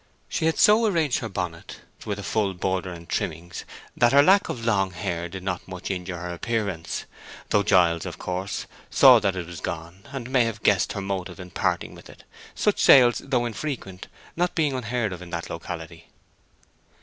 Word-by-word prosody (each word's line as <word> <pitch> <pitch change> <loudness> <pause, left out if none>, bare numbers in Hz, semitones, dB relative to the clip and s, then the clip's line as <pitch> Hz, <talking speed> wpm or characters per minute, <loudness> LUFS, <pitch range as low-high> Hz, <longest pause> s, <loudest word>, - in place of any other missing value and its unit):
She 160 - -2
had 160 - +1
so 220 +2 +6
arranged 160 - +1
her - - -5
bonnet 90 -3 -5 0.3
with 105 -1 -2
a 100 - -6
full 100 -2 0
border 95 0 -2
and 85 -1 -10
trimmings 85 +3 -4 0.3
that 120 +1 +3
her 140 +1 +7
lack 195 +5 +5
of 115 -2 -4
long 100 -4 +2
hair 85 0 -3
did 95 +1 -8
not 95 -2 -3
much 95 +1 -5
injure 90 -1 -4
her 90 +1 -5
appearance; 100 -4 -3 0.5
though 105 - +4
Giles, 90 -5 +3
of - - -7
course, 90 +2 -4 0.2
saw 130 -3 +8
that 100 -3 0
it 90 -2 -4
was 85 0 -9
gone, 85 +2 -6
and 130 -2 -6
may 130 -2 +4
have 115 -1 -4
guessed 100 -3 +3
her 100 - -4
motive 95 -3 -4
in 90 -1 -9
parting - - -1
with - - -14
it, - - -15 0.3
such - - +1
sales, 120 -4 +7
though 125 -3 0
infrequent, 115 -6 -5 0.5
being 155 -4 +2
not 130 - -2
unheard 115 -4 -1
of 90 - -8
in 90 - -9
that 85 -1 -5
locality. 80 0 -7
95 Hz, 190 wpm, -25 LUFS, 90-120 Hz, 0.5 s, saw